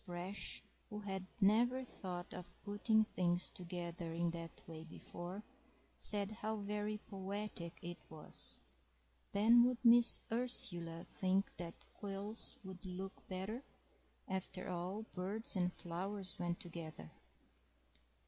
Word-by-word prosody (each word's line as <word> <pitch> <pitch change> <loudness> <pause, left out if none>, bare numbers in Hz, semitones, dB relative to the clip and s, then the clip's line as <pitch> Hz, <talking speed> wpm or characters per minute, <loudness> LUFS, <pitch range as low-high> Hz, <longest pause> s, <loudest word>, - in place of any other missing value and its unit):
Brash, 180 +2 -3 0.3
who 210 -2 -5
had 190 -2 -3
never 240 +6 +5
thought 180 -6 -5
of 180 - -8
putting 215 +2 +4
things 175 -4 +1
together 175 -2 -4
in 170 0 +2
that 165 -1 -7
way 160 -1 -7
before, 175 +4 -7 0.5
said 205 -1 +4
how 215 +1 -2
very 210 0 -1
poetic 195 -3 -4
it 175 0 -5
was. 155 -1 +1 0.7
Then 230 +4 +7
would 250 0 +3
Miss 235 0 +9
Ursula 175 -9 +2
think 190 +1 +1
that 170 -1 -6
quills 205 +5 -4
would 190 -2 -8
look 190 +1 -6
better? 195 +6 -3 0.7
After 190 0 -3
all, 180 +4 -2
birds 200 +5 +1
and 180 -1 +2
flowers 185 +2 -3
went 175 -1 0
together. 160 - -6
190 Hz, 120 wpm, -39 LUFS, 175-210 Hz, 0.7 s, Miss